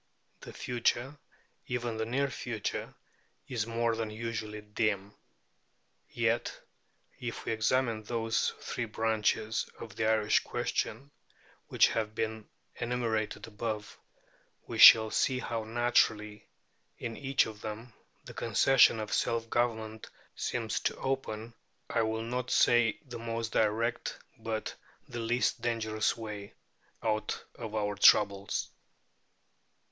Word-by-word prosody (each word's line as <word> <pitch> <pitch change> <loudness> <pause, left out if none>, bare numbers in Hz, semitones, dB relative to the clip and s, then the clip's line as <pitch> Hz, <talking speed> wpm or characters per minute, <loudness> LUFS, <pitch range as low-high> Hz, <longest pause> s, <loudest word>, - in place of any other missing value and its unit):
The - - -10
future, 125 +3 -1 0.5
even 120 -2 -2
the 110 0 -2
near 135 +4 +1
future, 115 -6 -4 0.5
is 115 -4 -2
more 115 0 0
than 115 -1 -3
usually 110 -1 -5
dim. 105 -1 -1 1.0
Yet, - - 0 0.6
if 120 -1 -5
we - - -1
examine 115 0 +1
those 115 0 0
three 120 - -3
branches 110 0 0
of 115 -3 -9
the 110 - 0
Irish 110 -1 +3
question 135 +6 -3 0.6
which - - +4
have 110 -1 -2
been 110 -1 -3 0.3
enumerated 120 -3 -1
above, 105 -1 -5 0.7
we - - -5
shall 110 -1 +10
see 130 - +2
how 115 -3 -3
naturally, 110 -2 +1 0.5
in 115 -1 -5
each 135 -1 +2
of 105 -1 -9
them, 110 +2 -7 0.3
the - - -9
concession 135 -4 +4
of 105 -1 -4
self 115 0 0
government 110 -2 -1 0.3
seems 115 -3 -2
to - - -1
open, 120 -4 -3 0.4
I 115 - +2
will 110 0 -1
not 125 +2 -3
say 120 -2 +4
the 120 -3 -8
most 115 0 -3
direct, 110 +2 0 0.2
but 110 -1 -3 0.3
the 120 - -6
least 120 +2 0
dangerous 110 -2 0
way, 105 -3 -7 0.5
out 110 -1 -1
of 110 -2 -7
our 105 -1 0
troubles. 100 0 +4
115 Hz, 120 wpm, -31 LUFS, 110-120 Hz, 1.0 s, shall